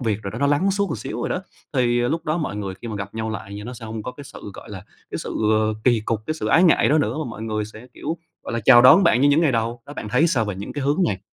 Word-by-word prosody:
việc 110 Hz, -4 st, -1 dB
rồi 100 Hz, -, -4 dB
đó, 115 Hz, -, -6 dB
nó 140 Hz, -, +2 dB
lắng 145 Hz, +8 st, +2 dB
xuống 200 Hz, +1 st, 0 dB
một 130 Hz, -, -4 dB
xíu 110 Hz, +2 st, -5 dB
rồi -, -, -1 dB
đó. 185 Hz, -, -2 dB, 0.3 s
Thì 120 Hz, -2 st, +2 dB
lúc 155 Hz, +8 st, -1 dB
đó 155 Hz, +2 st, 0 dB
mọi 150 Hz, -10 st, -3 dB
người 95 Hz, -2 st, -4 dB
khi 120 Hz, -, -5 dB
mà 105 Hz, -, -4 dB
gặp 100 Hz, +1 st, -6 dB
nhau 110 Hz, 0 st, -3 dB
lại 100 Hz, -2 st, -6 dB
nha, 105 Hz, +1 st, -7 dB
nó 125 Hz, -, -6 dB
sẽ 115 Hz, -, -10 dB
hông 110 Hz, -1 st, -5 dB
có 125 Hz, -, -6 dB
cái 145 Hz, -, -11 dB
sự, 105 Hz, -, -10 dB
gọi -, -, -11 dB
là, 95 Hz, -1 st, -8 dB, 0.3 s
cái -, -, -4 dB
sự -, -, -6 dB, 0.5 s
kỳ 120 Hz, -3 st, +4 dB
cục, 110 Hz, 0 st, -2 dB
cái 155 Hz, -, -1 dB
sự -, -, -4 dB
ái 170 Hz, -, +4 dB
ngại 170 Hz, -, +4 dB
đó 155 Hz, +2 st, +4 dB
nữa 145 Hz, -, 0 dB
và 155 Hz, -, -2 dB
mọi 110 Hz, -1 st, -8 dB
người 110 Hz, -1 st, -2 dB
sẽ, 110 Hz, +3 st, -12 dB
kiểu, 160 Hz, +4 st, -4 dB, 0.3 s
gọi -, -, -5 dB
là, 115 Hz, -, -1 dB
chào 120 Hz, -2 st, +8 dB
đón 155 Hz, +10 st, +8 dB
bạn 170 Hz, -8 st, +4 dB
như 145 Hz, -, +5 dB
những 145 Hz, +3 st, +4 dB
ngày 150 Hz, -6 st, +3 dB
đầu, 115 Hz, +1 st, -1 dB
đó 145 Hz, -, -9 dB
bạn 105 Hz, -, -6 dB
thấy 125 Hz, +9 st, +3 dB
sao 125 Hz, -9 st, +1 dB
về 105 Hz, -2 st, -3 dB
những 100 Hz, +2 st, -7 dB
cái 145 Hz, -2 st, -4 dB
hướng 145 Hz, +5 st, +1 dB
này? 95 Hz, -3 st, -2 dB
120 Hz, 330 wpm, -22 LUFS, 110-145 Hz, 0.5 s, chào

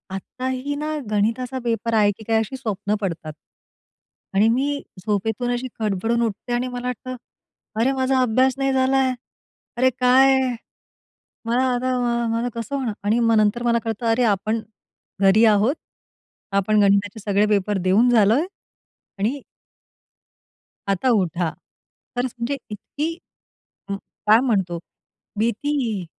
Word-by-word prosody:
आत्ताही 260 Hz, +7 st, -4 dB
ना 305 Hz, +1 st, -3 dB, 0.2 s
गणिताचा 230 Hz, +5 st, 0 dB
पेपर 230 Hz, -1 st, -1 dB
आहे, 210 Hz, -2 st, +4 dB
की 210 Hz, +2 st, -12 dB
काय 225 Hz, -1 st, +3 dB
अशी 225 Hz, +5 st, -3 dB
स्वप्न 210 Hz, -4 st, -2 dB
पडतात. 165 Hz, -5 st, -4 dB, 1.0 s
आणि 205 Hz, +3 st, +5 dB
मी 280 Hz, +4 st, 0 dB, 0.2 s
झोपेतून 220 Hz, +4 st, -1 dB
अशी 245 Hz, +1 st, -3 dB
खडबडून 220 Hz, +3 st, 0 dB
उठते 225 Hz, +3 st, -4 dB
आणि 245 Hz, +1 st, 0 dB
मला 245 Hz, 0 st, -5 dB
वाटतं, 255 Hz, +1 st, -5 dB, 0.6 s
"अरे, 245 Hz, +4 st, +3 dB
माझा 260 Hz, 0 st, +1 dB
अभ्यास 255 Hz, +2 st, +3 dB
नाही 270 Hz, 0 st, +1 dB
झालाय. 260 Hz, 0 st, +2 dB, 0.6 s
अरे 260 Hz, +1 st, +4 dB
काय? 265 Hz, +2 st, +5 dB, 1.1 s
मला 240 Hz, +3 st, +1 dB
आता 255 Hz, +1 st, 0 dB
माझ 235 Hz, -1 st, 0 dB
माझ 245 Hz, -, -1 dB
कसं 230 Hz, +4 st, -4 dB
होणार?" 255 Hz, -6 st, -2 dB
आणि 215 Hz, +3 st, +2 dB
मग 230 Hz, -1 st, +3 dB
नंतर 215 Hz, +3 st, +2 dB
मला 235 Hz, -1 st, +3 dB
कळतं 225 Hz, +1 st, -3 dB
"अरे, 230 Hz, +2 st, +2 dB
आपण 215 Hz, +1 st, +1 dB, 0.6 s
घरी 200 Hz, +4 st, +6 dB
आहोत. 215 Hz, +5 st, +4 dB, 0.8 s
आपण 200 Hz, +2 st, +2 dB
गणिताचे 200 Hz, +1 st, +2 dB
सगळे 205 Hz, 0 st, +2 dB
पेपर 205 Hz, -1 st, +1 dB
देऊन 200 Hz, +7 st, +4 dB
झालोय 230 Hz, -, +4 dB, 0.7 s
आणि" 245 Hz, +8 st, -1 dB, 1.5 s
आता 195 Hz, +6 st, +1 dB
उठा." 175 Hz, -2 st, -1 dB, 0.7 s
खरचं 245 Hz, +1 st, 0 dB
म्हणजे 240 Hz, +4 st, -2 dB
इतकी 255 Hz, +8 st, -4 dB, 0.8 s
उम्म, 200 Hz, -, -2 dB, 0.3 s
काय 215 Hz, +2 st, +7 dB
म्हणतो 190 Hz, -8 st, 0 dB, 0.6 s
भीती. 230 Hz, -3 st, -1 dB
230 Hz, 130 wpm, -22 LUFS, 205-255 Hz, 1.5 s, काय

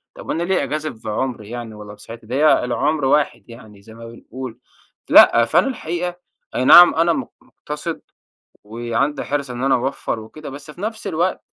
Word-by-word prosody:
طب -, -, -7 dB
أنا 170 Hz, -, -1 dB
ليه 190 Hz, +1 st, 0 dB
أجازف 155 Hz, -7 st, -5 dB
بعمري 110 Hz, -1 st, -3 dB
يعني 120 Hz, -2 st, -7 dB
والّا 105 Hz, -1 st, -10 dB
بصحتي؟ 115 Hz, +2 st, -12 dB
ده 125 Hz, -, -4 dB
هي 150 Hz, -1 st, +4 dB
العمر 140 Hz, +4 st, 0 dB
واحد 140 Hz, -2 st, 0 dB
يعني 110 Hz, -4 st, -14 dB
زي 110 Hz, +2 st, -15 dB
ما 115 Hz, 0 st, -11 dB
بنقول، 120 Hz, +1 st, -9 dB, 0.5 s
لأ 115 Hz, 0 st, +7 dB
فأنا 120 Hz, -, +2 dB
الحقيقة 175 Hz, -7 st, -4 dB, 0.4 s
أي 130 Hz, -, 0 dB
نعم 175 Hz, +5 st, +9 dB
أنا 165 Hz, +1 st, +3 dB
م 270 Hz, -, -4 dB
مُقتصد 165 Hz, -10 st, -7 dB, 0.6 s
وعندي 120 Hz, +6 st, -2 dB
حرص 140 Hz, -2 st, -3 dB
إن 125 Hz, +1 st, -5 dB
أنا 135 Hz, -, +3 dB
أوفّر 125 Hz, -2 st, -3 dB
وكده، 140 Hz, +8 st, -10 dB
بس 145 Hz, +2 st, -10 dB
في 175 Hz, -, -13 dB
نفس 220 Hz, -1 st, -4 dB
الوقت 180 Hz, +1 st, -1 dB
135 Hz, 175 wpm, -20 LUFS, 115-160 Hz, 0.6 s, نعم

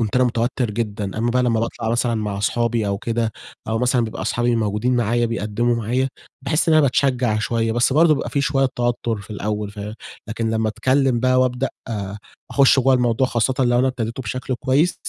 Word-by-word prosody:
كنت 110 Hz, -1 st, -1 dB
أنا 130 Hz, -, +4 dB
متوتر 120 Hz, 0 st, -1 dB
جدًا، 105 Hz, -2 st, -3 dB
أمّا 120 Hz, +1 st, +1 dB
بقى 125 Hz, +1 st, +2 dB
لمّا 115 Hz, -2 st, +1 dB
باطلع 115 Hz, -1 st, -3 dB
مثلًا 120 Hz, 0 st, +1 dB
مع 105 Hz, -2 st, -3 dB
أصحابي 115 Hz, +1 st, 0 dB
أو 100 Hz, 0 st, -1 dB
كده، 115 Hz, 0 st, -1 dB, 0.4 s
أو 110 Hz, 0 st, 0 dB
مثلًا 125 Hz, -1 st, +2 dB
بيبقى 110 Hz, -, -5 dB
أصحابي 120 Hz, 0 st, 0 dB
موجودين 110 Hz, +3 st, 0 dB
معايا 120 Hz, +1 st, +1 dB
بيقدّموا 115 Hz, +1 st, -1 dB
معايا، 125 Hz, +4 st, 0 dB, 0.3 s
باحس 155 Hz, +5 st, 0 dB
إن 160 Hz, -, +5 dB
أنا 155 Hz, -, +6 dB
باتشجع 125 Hz, -4 st, +1 dB
شوية. 115 Hz, +1 st, 0 dB
بس 120 Hz, +3 st, +2 dB
برضه 155 Hz, +1 st, +5 dB
بيبقى -, -, -4 dB
في 140 Hz, -, 0 dB
شوية 135 Hz, -2 st, +1 dB
توتر 120 Hz, -2 st, -1 dB
في 105 Hz, +1 st, -11 dB
الأول، 105 Hz, 0 st, -3 dB
فه 105 Hz, 0 st, -7 dB, 0.3 s
لكن 115 Hz, +1 st, -2 dB
لمّا 110 Hz, 0 st, 0 dB
أتكلم 130 Hz, +3 st, +1 dB
بقى 130 Hz, 0 st, +3 dB
وابدأ 130 Hz, +1 st, 0 dB, 0.8 s
أخش 135 Hz, -1 st, +5 dB
جوّا 130 Hz, +1 st, +4 dB
الموضوع، 125 Hz, 0 st, +2 dB
خاصةً 120 Hz, +2 st, 0 dB
لو 120 Hz, -1 st, +3 dB
أنا 130 Hz, -, +3 dB
ابتديته 120 Hz, 0 st, -4 dB
بشكل 130 Hz, +3 st, -3 dB
كويس، 140 Hz, +7 st, +1 dB
120 Hz, 195 wpm, -21 LUFS, 110-130 Hz, 0.8 s, أنا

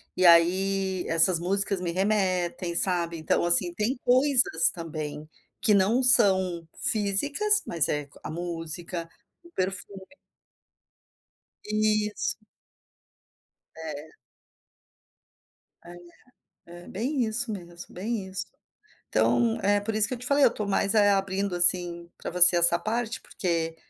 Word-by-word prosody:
e 185 Hz, -, +1 dB
aí 185 Hz, +2 st, +2 dB
essas 165 Hz, +2 st, +4 dB
músicas 195 Hz, +2 st, -1 dB
me 175 Hz, -, -3 dB
remetem 185 Hz, -2 st, -1 dB
sabe, 170 Hz, -3 st, -1 dB
então, 155 Hz, +1 st, -1 dB
assim, 175 Hz, 0 st, +3 dB
tem 220 Hz, +8 st, -2 dB
coisas 250 Hz, -, +3 dB
também, 155 Hz, -2 st, -7 dB, 0.3 s
que 215 Hz, -, +2 dB
não 205 Hz, +6 st, +2 dB
são 190 Hz, -8 st, +3 dB, 0.2 s
físicas, 285 Hz, -, +1 dB
mas 170 Hz, -3 st, -1 dB
é 150 Hz, -1 st, -3 dB, 0.2 s
a -, -, -7 dB
música, 170 Hz, 0 st, -6 dB, 0.3 s
o 345 Hz, -, -18 dB
perfume. 190 Hz, -, -5 dB, 1.6 s
Isso. 215 Hz, 0 st, -1 dB, 1.4 s
É. 155 Hz, -1 st, -8 dB, 1.7 s
É. 175 Hz, +1 st, -12 dB, 0.7 s
É, 175 Hz, +1 st, -14 dB
bem 250 Hz, +6 st, -2 dB
isso 225 Hz, +1 st, -3 dB
mesmo, 175 Hz, -4 st, -10 dB
bem 200 Hz, +1 st, -5 dB
isso. 190 Hz, 0 st, -5 dB, 0.6 s
Então 230 Hz, -2 st, +1 dB
é 205 Hz, +1 st, +1 dB
por 215 Hz, +2 st, -5 dB
isso 215 Hz, -1 st, +2 dB
que -, -, -4 dB
eu -, -, -9 dB
te 250 Hz, -, -6 dB
falei. 280 Hz, +1 st, +3 dB
Eu -, -, +6 dB
estou 215 Hz, -3 st, -6 dB
mais, 200 Hz, +1 st, 0 dB
eh, 205 Hz, -1 st, +4 dB
abrindo, 195 Hz, -1 st, -1 dB
assim, 175 Hz, -1 st, +3 dB
para -, -, -7 dB
você 180 Hz, 0 st, +7 dB
essa 170 Hz, 0 st, +5 dB
parte, 230 Hz, +2 st, -4 dB
porque 165 Hz, -3 st, -4 dB
190 Hz, 125 wpm, -25 LUFS, 170-215 Hz, 1.7 s, você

